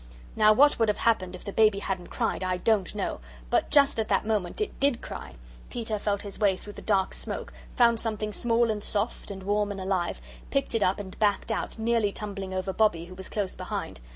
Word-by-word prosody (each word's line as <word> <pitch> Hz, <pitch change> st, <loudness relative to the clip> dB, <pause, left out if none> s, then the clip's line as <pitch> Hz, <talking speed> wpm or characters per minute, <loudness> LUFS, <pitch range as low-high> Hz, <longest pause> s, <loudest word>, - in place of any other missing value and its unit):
Now 215 Hz, 0 st, +6 dB
what 285 Hz, +6 st, +5 dB
would 225 Hz, -2 st, +3 dB
have 210 Hz, -, +1 dB
happened 185 Hz, -6 st, +1 dB
if 180 Hz, -, -12 dB
the 200 Hz, -, -5 dB
baby 215 Hz, -2 st, +4 dB
hadn't 190 Hz, -3 st, -3 dB
cried -, -, -1 dB
I 185 Hz, 0 st, 0 dB
don't 210 Hz, +1 st, +1 dB
know 200 Hz, -, -2 dB, 0.3 s
but -, -, +2 dB
just 285 Hz, -4 st, +5 dB
at 220 Hz, -, 0 dB
that 195 Hz, 0 st, +1 dB
moment 215 Hz, -, -1 dB
it 425 Hz, -, -3 dB
DID 275 Hz, -4 st, +2 dB
cry. -, -, -8 dB, 0.3 s
Peter 225 Hz, -3 st, -3 dB
felt 200 Hz, -1 st, -1 dB
his 200 Hz, -2 st, -5 dB
way 200 Hz, -3 st, +3 dB
through 205 Hz, -, -10 dB
the -, -, -10 dB
dark 195 Hz, -3 st, +1 dB
smoke, -, -, -4 dB, 0.2 s
found 235 Hz, -2 st, +4 dB
something 215 Hz, -2 st, -2 dB
small 235 Hz, 0 st, +2 dB
and 210 Hz, -1 st, -3 dB
soft 210 Hz, +2 st, -2 dB
and 195 Hz, -1 st, -7 dB
warm 205 Hz, +1 st, +1 dB
and 200 Hz, -1 st, -5 dB
alive, 185 Hz, -2 st, -1 dB, 0.3 s
picked 275 Hz, -1 st, 0 dB
it 225 Hz, -, +1 dB
up 190 Hz, 0 st, +2 dB
and 190 Hz, -2 st, -8 dB
backed 210 Hz, +1 st, +1 dB
out, 225 Hz, -, -3 dB
nearly 225 Hz, -2 st, +1 dB
tumbling 195 Hz, -2 st, -5 dB
over 185 Hz, 0 st, -2 dB
Bobbie 180 Hz, -5 st, +2 dB
who 180 Hz, -, -11 dB
was 190 Hz, 0 st, -7 dB
close 205 Hz, -3 st, -2 dB
behind. -, -, -5 dB
210 Hz, 220 wpm, -27 LUFS, 190-225 Hz, 0.3 s, Now